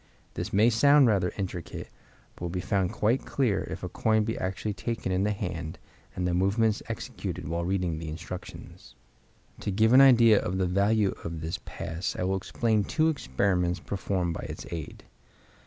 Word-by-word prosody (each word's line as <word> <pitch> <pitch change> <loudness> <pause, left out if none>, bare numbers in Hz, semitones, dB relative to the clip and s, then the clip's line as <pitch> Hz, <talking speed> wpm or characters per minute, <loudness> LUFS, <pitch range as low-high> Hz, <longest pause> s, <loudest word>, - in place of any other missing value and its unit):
This - - -4
may 110 +4 +4
sound 140 +5 +6
rather 95 -6 +2
intricate, 90 -4 -5 0.5
but - - -20
will 85 - -2
be 90 +2 -3
found 95 -1 0
quite 120 +5 +1
clear 125 -8 0
if - - -6
a - - -2
coin 110 -1 +1
be 115 +1 -2
actually 95 +3 -3
taken 110 -1 -3
in 95 +2 +1
the 105 - +1
hand, 85 -5 -4 0.4
and 90 - -2
the 90 - 0
movements 100 +4 +2
executed - - -5
while 85 +2 -2
reading 90 -4 -1
the 80 -1 -5
instructions. 85 +3 -9 0.6
To - - -3
give 110 +4 +3
an 130 - +9
idea 115 -5 +7
of 95 - -2
the 95 - +1
value 100 +3 +2
of 80 -1 -5
this 80 +1 -3
pass 85 +3 -4
I - - -1
will 95 +1 +1
explain 110 +2 0
two 160 +9 +1
experiments 90 - 0
performed 95 -2 -2
by - - -6
its - - -7
aid. 80 -3 -6
95 Hz, 180 wpm, -28 LUFS, 90-110 Hz, 0.6 s, an